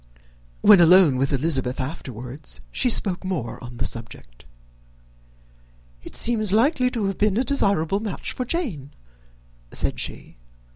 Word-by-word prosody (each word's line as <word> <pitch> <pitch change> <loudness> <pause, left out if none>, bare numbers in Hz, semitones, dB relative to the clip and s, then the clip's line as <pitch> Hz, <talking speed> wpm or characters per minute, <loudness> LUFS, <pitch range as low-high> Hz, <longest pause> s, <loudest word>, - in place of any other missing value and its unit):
When 210 -2 +7
alone 170 -5 +6
with 135 +1 0
Elizabeth 135 -3 0
afterwards, 130 0 -6
she 255 - +1
spoke 195 -5 0
more 170 -11 -4
on 120 0 -9
the - - -2
subject. - - -4 1.6
"It - - -10
seems 220 -4 +2
likely 250 +4 +2
to 230 -5 -3
have 195 -1 -3
been 210 -1 +2
a 250 - +2
desirable 200 - +1
match 210 -3 -4
for 255 - -4
Jane," 230 - -4 0.8
said - - 0
she. - - -6
180 Hz, 135 wpm, -23 LUFS, 130-215 Hz, 1.6 s, When